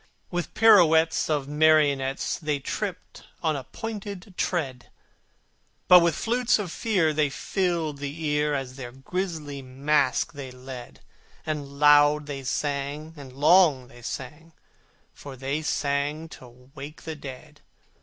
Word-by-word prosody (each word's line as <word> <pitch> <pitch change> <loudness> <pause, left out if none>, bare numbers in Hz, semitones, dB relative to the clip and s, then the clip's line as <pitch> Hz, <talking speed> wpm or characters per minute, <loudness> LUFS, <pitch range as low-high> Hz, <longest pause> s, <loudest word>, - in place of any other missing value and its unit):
With 175 -1 -1
the - - -10
pirouettes 165 -9 +5
of 145 -3 0
marionettes, 145 -3 +2
They 150 -3 -1
tripped 185 +7 -5 0.2
on 155 -5 0
pointed 205 -2 -7
tread: 135 -11 -2 1.0
But 180 - +10
with 170 -2 +2
flutes 245 +1 +1
of 200 -6 -4
Fear 180 -9 +1
they 150 -1 +2
filled 165 -1 -2
the 145 +2 -5
ear, 150 0 +1
As 135 -1 -5
their 125 -3 -7
grisly 150 0 -4
masque 135 +4 0
they 140 -2 -7
led, 125 -1 -10 0.4
And 145 -3 -4
loud 145 0 +6
they 140 -2 -6
sang, 145 +3 -3
and 140 -4 -11
long 145 -2 +4
they 120 -3 -15
sang, 150 +7 -7 0.6
For 140 -2 -10
they 135 +4 -3
sang 145 +1 -1
to 125 0 -15
wake 145 +1 -9
the 160 -1 -5
dead. 145 +1 -10
150 Hz, 135 wpm, -26 LUFS, 135-165 Hz, 1.0 s, But